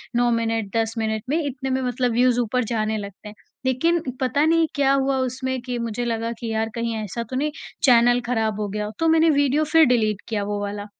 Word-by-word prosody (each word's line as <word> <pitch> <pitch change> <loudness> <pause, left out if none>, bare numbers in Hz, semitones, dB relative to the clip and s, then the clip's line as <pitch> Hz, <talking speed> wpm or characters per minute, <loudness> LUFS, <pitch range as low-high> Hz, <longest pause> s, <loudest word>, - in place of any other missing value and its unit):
9 240 0 +3
minute, 225 -2 -1
10 225 0 0
minute 220 -1 -1
में 310 - +2
इतने 265 -1 -4
में 260 0 0
मतलब 250 0 0
व्यूज़ 245 +1 +3
ऊपर 245 +2 0
जाने 215 0 0
लगते 200 0 -8
हैं। 210 - -13 0.3
लेकिन 330 +7 +2 0.2
पता 280 +4 +2
नहीं 325 0 +3
क्या 275 -1 +3
हुआ 270 0 +1
उसमें 260 0 -2
कि 250 -1 -4
मुझे 235 +1 -3
लगा 230 0 -2
कि 230 -1 -4
यार 220 0 -1
कहीं 230 -1 -2
ऐसा 230 +4 -4
तो 255 - -5
नहीं 300 +3 0 0.3
चैनल 245 -1 +5
खराब 220 -3 -1
हो 210 - -1
गया 210 +1 -3
हो, 210 - -5
तो 325 - +2
मैंने 325 0 +4
वीडियो 285 +1 +2
फिर 320 +1 +5
डिलीट 215 -5 +1
किया 210 -2 -1
वो 205 0 -3
वाला, 205 0 -4
240 Hz, 225 wpm, -23 LUFS, 220-265 Hz, 0.3 s, चैनल